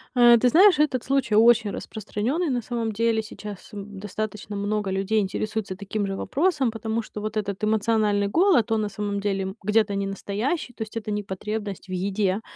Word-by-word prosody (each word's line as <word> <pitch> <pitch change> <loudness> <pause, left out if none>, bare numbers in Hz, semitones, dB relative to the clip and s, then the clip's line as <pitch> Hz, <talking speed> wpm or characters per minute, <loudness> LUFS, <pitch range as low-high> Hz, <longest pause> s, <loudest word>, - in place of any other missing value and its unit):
Э, 240 -1 +7
ты 250 - +4
знаешь, 360 +3 +6
этот 265 -6 +2
случай 270 -5 +1
очень 225 0 +5
распространённый 230 - -3
на 250 -2 0
самом 230 -1 -2
деле. 225 +1 +1
Сейчас, 210 -2 -9
м, 205 -1 -8
достаточно 210 +1 -5
много 205 0 -1
людей 195 +3 +1
интересуются 205 0 -2
таким 200 +1 -3
же 195 - -3
вопросом, 280 - +1
потому 225 +1 -2
что 210 - -8
вот 215 0 -3
этот 200 -1 -3
эмоциональный 215 -1 +2
голод, 280 - +3
он 220 -1 +2
на 210 - -2
самом 205 0 -3
деле, 195 -1 -1
м, 190 +1 -5
где-то 210 0 +2
не 195 0 -1
настоящий. 235 - -3
То - - -13
есть 220 +1 -8
это 215 -1 -4
не 205 0 -2
потребность 200 0 -5
в - - -7
еде, 190 +2 0
215 Hz, 190 wpm, -25 LUFS, 200-230 Hz, -, Э